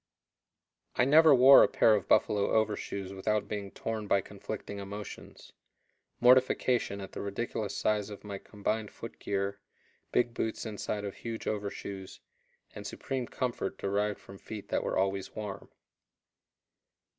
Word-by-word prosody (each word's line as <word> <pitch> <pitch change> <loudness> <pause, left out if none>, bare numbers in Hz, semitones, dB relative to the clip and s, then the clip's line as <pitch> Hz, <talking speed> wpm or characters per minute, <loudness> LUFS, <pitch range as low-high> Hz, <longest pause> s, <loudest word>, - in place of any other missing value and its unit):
I 125 - +4
never 155 +1 +7
wore 130 +2 +9
a - - +6
pair 110 - +4
of 105 - 0
buffalo 100 -1 +3
overshoes 100 -3 -1
without 105 +2 -1
being 100 -2 -4
torn 110 +1 -4
by 100 - +3
conflicting 100 +2 -7
emotions 100 +1 -9 0.7
mortification 125 -3 +4
at 95 - -7
the - - -6
ridiculous 100 0 -3
size 105 -1 0
of 105 - -9
my 100 -2 -6
combined 105 +1 -3
foot 115 - -10
gear, 100 0 -2 0.5
big 120 -1 +2
boots 110 -2 -2
inside 105 -1 -3
of 100 - -6
huge 115 -1 -6
overshoes, 100 -2 -5 0.5
and - - -7
supreme 130 -3 -4
comfort 125 -7 -3
derived 100 +1 0
from 95 0 -13
feet 110 -2 -8
that - - 0
were - - -1
always 95 0 -1
warm. 105 -2 -6
105 Hz, 140 wpm, -30 LUFS, 100-115 Hz, 0.7 s, wore